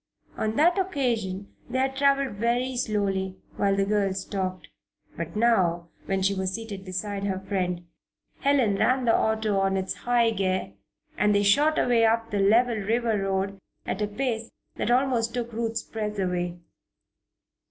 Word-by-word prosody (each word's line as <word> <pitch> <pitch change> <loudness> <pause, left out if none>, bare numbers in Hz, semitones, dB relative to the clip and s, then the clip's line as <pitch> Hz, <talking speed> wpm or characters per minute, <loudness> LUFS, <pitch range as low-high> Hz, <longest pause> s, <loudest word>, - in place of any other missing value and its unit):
On 220 0 -1
that 345 +7 +4
occasion 235 - -1 0.2
they 255 - -2
had 265 +1 0
traveled 275 -5 +2
very 245 +4 0
slowly, 195 -5 -1 0.2
while 195 -1 +2
the 195 0 +1
girls 195 -2 0
talked. 185 -4 -3 0.5
But 170 0 -5
now, 185 -7 +2 0.2
when 195 -1 0
she 195 +1 +3
was 190 -1 -2
seated 215 -4 -7
beside 195 +2 -4
her 195 -2 -1
new 190 - -10
friend, 180 -3 -2 0.5
Helen 260 -8 +2
ran 255 +3 +2
the 230 - +4
auto 220 -2 +1
on 195 0 +1
its 190 0 -2
high 240 -1 +2
gear, 185 - -1 0.5
and 210 0 +3
they 205 - +3
shot 290 +10 +4
away 240 -2 +3
up 225 0 +2
the 205 - 0
level 225 +4 +4
river 225 +2 0
road 195 +1 -1 0.3
at - - -3
a 210 - +1
pace 230 +1 -2 0.3
that - - -2
almost 245 -2 +2
took 240 -1 -3
Ruth's 225 0 -2
breath 210 -1 -4
away. 180 -2 -1
210 Hz, 165 wpm, -26 LUFS, 195-235 Hz, 0.5 s, that